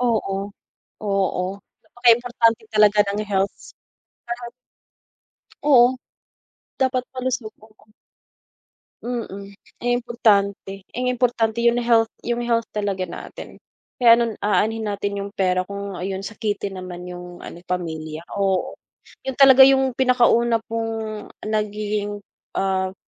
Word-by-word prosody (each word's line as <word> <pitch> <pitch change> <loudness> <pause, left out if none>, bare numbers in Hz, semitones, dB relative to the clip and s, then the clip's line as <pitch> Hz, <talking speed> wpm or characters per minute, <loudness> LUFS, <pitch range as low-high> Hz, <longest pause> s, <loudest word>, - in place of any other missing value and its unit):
Oo, 205 -5 -1 0.5
oo, 195 -3 0 0.4
napaka 240 0 -1
importante 230 -2 +1
talaga 210 -1 +5
ng 205 +1 -2
healths. 195 0 -2 0.5
Lahat 240 0 -5 1.1
Oo, 255 -3 +6 0.9
dapat 255 -1 +1
malusog, 255 -4 -3
oo. 215 0 -24 1.1
Mm, 220 -5 -5 0.3
eh, 245 0 +1
importante, 200 -5 0
eh 250 - -6
importante 240 -2 0
'yung 235 0 +4
health 230 -1 +4 0.2
yung 240 0 -1
health 230 -1 0
talaga 200 -3 -2
natin. 180 - -8 0.4
Kaya 235 -2 +8
anon 235 -2 -1
aanhin 220 +2 0
natin 200 0 -2
'yung 200 +1 -6
pera 185 -1 +1
kung 200 -1 -6
ah, 180 - -3
'yun 190 0 -4
sakitin 205 -2 -4
naman 180 -1 -7
'yung 175 0 -9
ano - - -9
pamilya 160 -3 -4 0.2
oo. 195 -2 0 0.5
'Yun 265 - -2
talaga 265 -1 +8
'yung 265 -1 +4
pinakauna 240 -3 +3
pong 225 -1 -3 0.2
nagiging, 210 -1 -2 0.3
ah, 190 -1 0
215 Hz, 115 wpm, -22 LUFS, 195-240 Hz, 1.1 s, Kaya